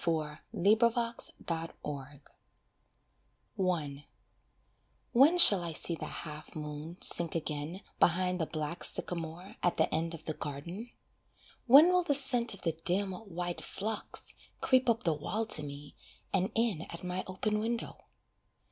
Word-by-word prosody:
END 165 Hz, +6 st, 0 dB
OF 235 Hz, 0 st, +3 dB
ANOTHER 235 Hz, 0 st, -1 dB, 0.3 s
HOME 165 Hz, -1 st, -2 dB, 0.2 s
HOLIDAY 140 Hz, -1 st, -7 dB, 1.6 s
I 140 Hz, 0 st, -10 dB, 1.0 s
When 280 Hz, +8 st, +6 dB
shall 205 Hz, -, +9 dB
I 170 Hz, -1 st, -4 dB
see 170 Hz, -, -1 dB
the 165 Hz, -, -5 dB
half 150 Hz, -2 st, -8 dB
moon 150 Hz, +2 st, -7 dB
sink 170 Hz, -1 st, +3 dB
again 155 Hz, +3 st, -4 dB, 0.2 s
Behind 180 Hz, +1 st, +2 dB
the 160 Hz, -, -1 dB
black 155 Hz, +1 st, -4 dB
sycamore 170 Hz, +2 st, -1 dB
at 175 Hz, -, +1 dB
the -, -, +1 dB
end 165 Hz, +2 st, -1 dB
of 160 Hz, -, -13 dB
the 155 Hz, -, -3 dB
garden? 170 Hz, -, -7 dB, 0.8 s
When 285 Hz, +8 st, +9 dB
will 360 Hz, -, +4 dB
the 290 Hz, -5 st, +3 dB
scent 245 Hz, -5 st, +4 dB
of -, -, -16 dB
the 165 Hz, -, +1 dB
dim, 190 Hz, +2 st, 0 dB
white 180 Hz, -3 st, -5 dB
phlox 215 Hz, +2 st, -5 dB, 0.3 s
Creep 255 Hz, -1 st, +3 dB
up 230 Hz, +1 st, +1 dB
the 165 Hz, -, +2 dB
wall 190 Hz, +9 st, -3 dB
to 185 Hz, -, +3 dB
me, 145 Hz, 0 st, -9 dB, 0.4 s
and 185 Hz, +1 st, +1 dB
in 225 Hz, -8 st, +1 dB
at 170 Hz, -, -9 dB
my 180 Hz, +1 st, -3 dB
open 210 Hz, +3 st, -1 dB
window? 230 Hz, +2 st, -4 dB
175 Hz, 145 wpm, -31 LUFS, 155-220 Hz, 1.6 s, shall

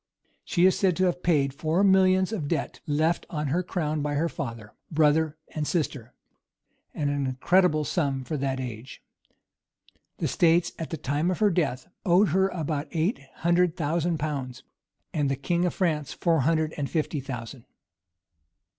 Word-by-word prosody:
She 175 Hz, 0 st, +2 dB
is 190 Hz, -, +5 dB
said 185 Hz, -3 st, +2 dB
to 185 Hz, -, +2 dB
have 180 Hz, 0 st, 0 dB
paid 140 Hz, -6 st, +2 dB
four 160 Hz, +6 st, 0 dB
millions 190 Hz, 0 st, +4 dB
of 165 Hz, -10 st, -3 dB
debt, 165 Hz, +1 st, -2 dB
left 155 Hz, +3 st, +1 dB
on 150 Hz, -3 st, -2 dB
the 175 Hz, +4 st, +2 dB
crown 155 Hz, -4 st, -2 dB
by 145 Hz, 0 st, -1 dB
her 165 Hz, +4 st, +1 dB
father, 115 Hz, -8 st, -6 dB, 0.2 s
brother, 155 Hz, 0 st, +2 dB
and 150 Hz, -1 st, -3 dB
sister; 140 Hz, -8 st, -2 dB, 0.8 s
an 145 Hz, -1 st, 0 dB
incredible 150 Hz, +4 st, +2 dB
sum 140 Hz, -6 st, -1 dB
for 155 Hz, -, -4 dB
that 135 Hz, -1 st, -1 dB
age.[] 125 Hz, -1 st, -7 dB, 1.1 s
The -, -, -1 dB
states 170 Hz, 0 st, +3 dB
at 165 Hz, -, -4 dB
the 160 Hz, -, -4 dB
time 145 Hz, +5 st, -1 dB
of 185 Hz, -, -1 dB
her 210 Hz, -2 st, +3 dB
death 145 Hz, -8 st, -1 dB, 0.2 s
owed 185 Hz, +3 st, +4 dB
her 190 Hz, +4 st, +3 dB
about 155 Hz, -4 st, -3 dB
eight 170 Hz, -, 0 dB, 0.2 s
hundred 175 Hz, 0 st, +2 dB
thousand 165 Hz, +1 st, 0 dB
pounds; 135 Hz, -4 st, -4 dB, 0.5 s
and, 145 Hz, -3 st, +1 dB
the 135 Hz, -, +1 dB
king 170 Hz, +6 st, 0 dB
of 175 Hz, -, -1 dB
France 155 Hz, -6 st, 0 dB
four 165 Hz, -2 st, +1 dB
hundred 155 Hz, +2 st, +1 dB
and 145 Hz, -2 st, -2 dB
fifty 155 Hz, -2 st, -1 dB
thousand. 125 Hz, -2 st, -7 dB
155 Hz, 165 wpm, -26 LUFS, 140-175 Hz, 1.1 s, is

